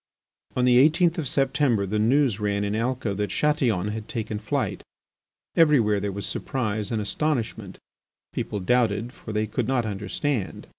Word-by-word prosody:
On 125 Hz, -, +2 dB
the 125 Hz, 0 st, +6 dB
eighteenth 165 Hz, +4 st, +4 dB
of 150 Hz, -, -2 dB
September 135 Hz, -5 st, +1 dB
the 105 Hz, +2 st, -1 dB
news 120 Hz, -1 st, +3 dB
ran 100 Hz, -1 st, 0 dB
in 105 Hz, +1 st, -1 dB
Alca 115 Hz, -2 st, -1 dB
that 105 Hz, +1 st, -2 dB
Chatillon 125 Hz, -, +1 dB
had 110 Hz, 0 st, -5 dB
taken 110 Hz, -2 st, -4 dB
flight. 105 Hz, -, -2 dB, 0.7 s
Everywhere 125 Hz, -11 st, +4 dB
there 100 Hz, 0 st, -2 dB
was 100 Hz, +1 st, -5 dB
surprise 110 Hz, -5 st, -2 dB
and 115 Hz, -, 0 dB
astonishment. 110 Hz, -3 st, -2 dB, 0.6 s
People 105 Hz, -, -3 dB
doubted, 120 Hz, +2 st, +1 dB
for 110 Hz, -, -9 dB
they 105 Hz, 0 st, 0 dB
could 105 Hz, -, -2 dB
not 130 Hz, -3 st, +1 dB
understand. 105 Hz, +3 st, -3 dB
110 Hz, 155 wpm, -25 LUFS, 105-130 Hz, 0.7 s, the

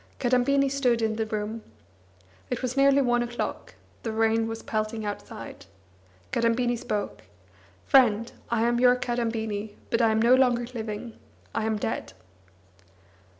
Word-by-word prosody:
Kadambini 265 Hz, +2 st, +2 dB
stood 260 Hz, -4 st, +1 dB
in 220 Hz, -1 st, +1 dB
the 220 Hz, -1 st, -1 dB
room. 215 Hz, +1 st, -3 dB, 0.9 s
It -, -, -3 dB
was 255 Hz, 0 st, -2 dB
nearly 275 Hz, 0 st, +5 dB
one 240 Hz, -1 st, +2 dB
o'clock, 240 Hz, 0 st, -4 dB, 0.3 s
the 225 Hz, -, -3 dB
rain 225 Hz, 0 st, +2 dB
was 225 Hz, 0 st, -6 dB
pelting 215 Hz, 0 st, -2 dB
outside. 205 Hz, 0 st, -7 dB, 0.6 s
Kadambini 240 Hz, +1 st, +1 dB
spoke: 210 Hz, -3 st, -3 dB, 0.6 s
"Friend, 230 Hz, -5 st, +4 dB, 0.2 s
I 230 Hz, -1 st, +1 dB
am 240 Hz, 0 st, +2 dB
your 250 Hz, 0 st, +6 dB
Kadambini, 225 Hz, -4 st, -2 dB, 0.2 s
but 230 Hz, -, +2 dB
I 225 Hz, -, +4 dB
am 220 Hz, 0 st, +2 dB
no 235 Hz, +3 st, +5 dB
longer 250 Hz, -2 st, +3 dB
living. 220 Hz, 0 st, -6 dB, 0.3 s
I 220 Hz, -, -1 dB
am 220 Hz, -1 st, 0 dB
dead." 215 Hz, -, -3 dB
230 Hz, 140 wpm, -26 LUFS, 220-245 Hz, 0.9 s, your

